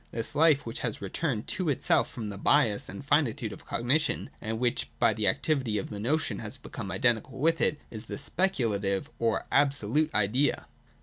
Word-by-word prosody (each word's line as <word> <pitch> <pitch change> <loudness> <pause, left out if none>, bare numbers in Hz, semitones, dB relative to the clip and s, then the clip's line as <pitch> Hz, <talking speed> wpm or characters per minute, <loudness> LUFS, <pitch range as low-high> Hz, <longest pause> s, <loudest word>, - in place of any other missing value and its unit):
This 115 0 -3
life 150 -2 +4
which 115 - -5
has 115 -4 -3
returned 115 - -2
to 185 -4 -1
itself 140 - +2
from 110 -4 -6
the 100 -1 -7
bias 115 -5 +3
and 100 +7 -8
finitude 140 -6 +1
of - - -13
cognition, 135 +7 0
and 110 +1 -3
which 120 +1 -1
by - - +4
the 105 -1 -1
activity 125 +1 +1
of 100 - -4
the 105 - -5
notion 125 -2 0
has 115 +4 -5
become 115 -5 -7
identical 110 +3 0
with 165 +4 +2
it, 150 - +2
is 110 -2 -7
the - - -5
Speculative 115 - 0
or 115 -1 +1
Absolute 145 +2 +2
Idea. 115 +8 +2
120 Hz, 180 wpm, -28 LUFS, 105-145 Hz, -, life